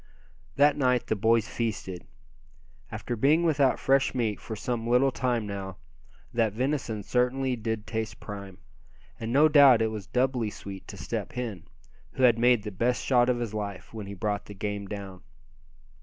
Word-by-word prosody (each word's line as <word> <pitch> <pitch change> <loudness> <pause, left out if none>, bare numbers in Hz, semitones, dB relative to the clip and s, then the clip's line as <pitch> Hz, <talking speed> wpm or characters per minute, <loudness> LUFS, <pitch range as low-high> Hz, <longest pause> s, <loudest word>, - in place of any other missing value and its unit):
That 145 +1 +5
night 125 -3 +2
the - - 0
boys 110 +2 +2
feasted. 95 -6 -4 0.8
After 110 +2 -4
being 145 +9 +3
without 145 -5 +3
fresh 135 0 +2
meat 110 -4 -1
for 110 - -6
some 115 0 -3
little 125 +3 +4
time 120 -3 -1
now, 95 -2 -6 0.6
that 115 -3 +1
venison 125 -3 -2
certainly 125 +3 0
did 110 -1 -3
taste 110 -3 -4
prime. 100 -3 -8 0.6
And 115 0 -4
no 145 +5 +6
doubt 140 -5 +7
it 110 -1 +1
was 105 -3 -6
doubly 125 -3 0
sweet 100 -2 -9
to - - -9
Step - - -4
Hen, 115 -8 -5 0.5
who 130 - -1
had 120 -2 +5
made 120 -2 +4
the 105 - -5
best 120 +6 0
shot 125 -2 +4
of 125 - +2
his 120 -3 -4
life 100 -2 -5
when 110 -3 -6
he 100 - -7
brought 105 +2 -2
the 105 - -9
game 100 0 -4
down. 95 -2 -7
115 Hz, 170 wpm, -27 LUFS, 105-125 Hz, 0.8 s, doubt